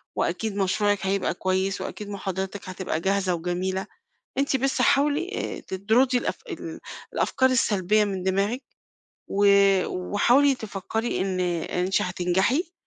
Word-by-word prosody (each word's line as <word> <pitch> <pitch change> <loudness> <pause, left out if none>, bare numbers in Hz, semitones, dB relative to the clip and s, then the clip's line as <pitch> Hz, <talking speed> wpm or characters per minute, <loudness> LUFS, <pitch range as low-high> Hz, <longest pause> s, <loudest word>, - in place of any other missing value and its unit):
وأكيد 220 -3 -1
مشروعِك 205 0 +1
هيبقى 195 -2 0
كويس 190 +1 -1
وأكيد 210 -1 -6
محاضراتِك 190 -1 -4
هتبقى 185 -4 -3
جاهزة 190 -1 +1
وجميلة، 180 +3 -2 0.5
أنتِ 275 -1 +2
بس 265 0 0
حاولي 290 +6 +2 0.3
آآ - - -8
تطرُدي 230 +7 +1
الأف - - -2
ال 335 -2 -6 0.3
الأفكار 260 0 +2
السلبية 210 -4 +2
من 190 -2 -3
دماغِك 200 +7 0 0.6
و 205 +1 +1 0.4
وحاولي 245 +9 +3
تفكري 220 +1 -3
إن 190 -1 -1
إن 180 0 -1
أنتِ 190 - +1
هتنجحي، 190 - 0
200 Hz, 125 wpm, -25 LUFS, 185-245 Hz, 0.6 s, وحاولي